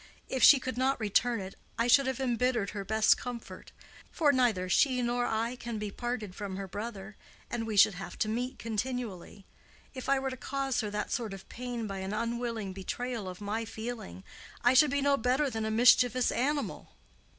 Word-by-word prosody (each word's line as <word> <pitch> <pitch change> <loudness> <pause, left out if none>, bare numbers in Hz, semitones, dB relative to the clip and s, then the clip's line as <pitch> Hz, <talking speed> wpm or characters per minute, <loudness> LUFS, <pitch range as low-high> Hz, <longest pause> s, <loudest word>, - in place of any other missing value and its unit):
If 260 - -2
she 275 - +9
could 255 -1 -4
not 265 0 +1
return 225 +2 +1
it, 190 0 -7 0.2
I 230 - +2
should 265 +3 +5
have 265 -1 -2
embittered 245 -4 0
her 205 -2 -5
best 220 +2 +4
comfort; 245 -2 -8 0.4
for 300 -4 +3
neither 230 -8 +2
she 255 +7 +3
nor 245 0 0
I 230 +3 -1
can 235 -2 -5
be 210 -1 -4
parted 240 -4 -4
from 195 -1 -5
her 195 0 -5
brother, 205 0 -7 0.3
and 225 -2 -2
we 215 -2 -3
should 200 - +7
have 180 -1 -8
to - - 0
meet 245 +4 -2
continually. 225 -4 -4 0.5
If 260 -1 -6
I 275 - +4
were 265 0 -2
to 255 - -6
cause 270 -1 -1
her 210 - -3
that 210 0 -3
sort 225 -5 -2
of 190 - -13
pain 245 -2 -5
by 195 -2 -5
an 190 +2 -4
unwilling 230 -3 -3
betrayal 215 +2 -4
of 180 +2 -9
my 210 +3 -2
feeling, 220 - -7 0.4
I 245 +1 +5
should 285 +3 +6
be 280 +1 0
no 280 0 +3
better 260 +4 +1
than 220 -1 -2
a - - -1
mischievous 245 +2 +4
animal." 285 +4 -2
235 Hz, 195 wpm, -30 LUFS, 210-250 Hz, 0.5 s, she